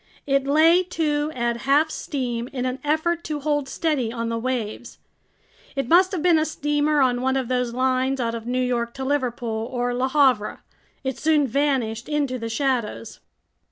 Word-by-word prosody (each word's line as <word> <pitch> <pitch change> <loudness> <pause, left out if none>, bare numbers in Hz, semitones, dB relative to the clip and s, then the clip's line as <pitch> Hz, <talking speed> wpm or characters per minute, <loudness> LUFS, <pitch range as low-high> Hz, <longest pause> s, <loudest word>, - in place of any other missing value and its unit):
It 275 -1 +1
lay 320 +5 +5
to 310 -4 -1
at 235 -1 -1
half 280 +5 +2
steam 245 -6 -3
in 255 -1 -4
an 255 +1 -2
effort 315 +3 0
to 305 -2 -3
hold 290 -1 -1
steady 290 -9 -1
on 230 -1 -3
the 230 - -1
waves. 240 -2 -4 0.8
It 275 -3 -1
must 365 +5 +5
have 355 -6 -3
been 345 -3 +5
a - - +2
steamer 295 -1 +1
on 245 -2 +2
one 265 +1 +1
of 255 -2 -2
those 250 -1 0
lines 260 +1 +1
out 230 -2 -1
of 230 0 -6
New 255 +1 0
York 235 -1 -1
to 265 - -4
Liverpool 240 -5 -2
or 245 -1 -1
Le 250 +2 0
Havre. 260 -7 +2 0.4
It 265 -1 -3
soon 305 -2 +3
vanished 255 -3 -1
into 285 -4 -1
the 230 0 -4
shadows. 235 -3 -2
265 Hz, 180 wpm, -23 LUFS, 245-295 Hz, 0.8 s, lay